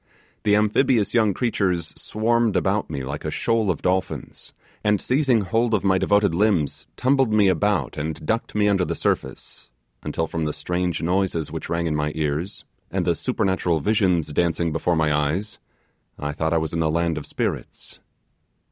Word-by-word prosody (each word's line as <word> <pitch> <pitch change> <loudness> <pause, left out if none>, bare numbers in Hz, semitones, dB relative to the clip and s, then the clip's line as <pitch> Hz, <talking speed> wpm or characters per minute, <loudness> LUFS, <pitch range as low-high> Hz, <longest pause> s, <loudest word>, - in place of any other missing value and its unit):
The 105 -1 +3
amphibious 105 +1 +2
young 110 -3 +4
creatures 95 -9 0
swarmed 115 0 0
about 100 +2 +1
me 70 -4 -4
like 70 +3 -5
a 75 - -2
shoal 115 +5 0
of 90 - -2
dolphins, 95 +1 -2 0.3
and 105 -1 +2
seizing 130 -2 +2
hold 110 +4 +1
of 100 - -1
my 95 -1 +3
devoted 100 -3 +3
limbs, 90 -6 +1
tumbled 130 -2 +2
me 105 -2 +4
about 95 0 0
and 75 0 -4
ducked 115 +5 -2
me 105 -1 +3
under 100 -3 +2
the - - -2
surface, - - -3 0.3
until 80 - -2
from 80 0 -3
the 75 - -2
strange 90 +2 -2
noises 90 -3 0
which 80 -1 -6
rang 85 0 -1
in 80 -2 0
my 75 0 0
ears, 80 +5 -2 0.2
and - - -1
the - - +3
supernatural 90 -4 0
visions 90 -4 +1
dancing 85 0 +1
before 85 +2 0
my 80 -2 +2
eyes, 80 +9 -1 0.6
I 75 0 -3
thought 80 +2 -2
I - - +3
was 80 0 -2
in 85 - -1
the 80 -1 +2
land 85 0 0
of - - -9
the - - -11
spirits. - - -4
90 Hz, 180 wpm, -23 LUFS, 80-105 Hz, 0.6 s, young